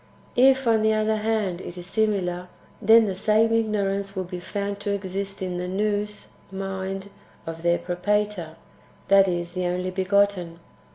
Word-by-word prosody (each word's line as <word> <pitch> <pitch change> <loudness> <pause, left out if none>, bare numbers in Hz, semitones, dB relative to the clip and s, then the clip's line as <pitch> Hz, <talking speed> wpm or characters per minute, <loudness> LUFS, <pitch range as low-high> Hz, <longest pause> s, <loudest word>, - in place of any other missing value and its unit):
If, 265 +1 +5
on 225 -2 +3
the 220 0 +3
other 215 0 +1
hand, 210 -5 -1
it 175 - -8
is 175 - -7
simiLir, 185 -3 0 0.3
then 225 +1 +7
the 195 - -1
same 215 +4 +2
ignorance 200 -3 0
will 190 - -1
be 180 0 -6
found 200 +2 -4
to 205 - -4
exist 195 0 -4
in 180 -1 -3
the 180 - -3
Nous 210 +2 -2 0.2
(mind) 195 0 -4 0.3
of 165 0 -6
their 170 0 +3
Propator, 185 -2 -1 0.5
that 195 0 +6
is, 175 -1 -2
in 185 - -1
the 180 - 0
Only 180 +1 -2
begotten. 190 -2 +1
195 Hz, 165 wpm, -25 LUFS, 180-210 Hz, 0.5 s, then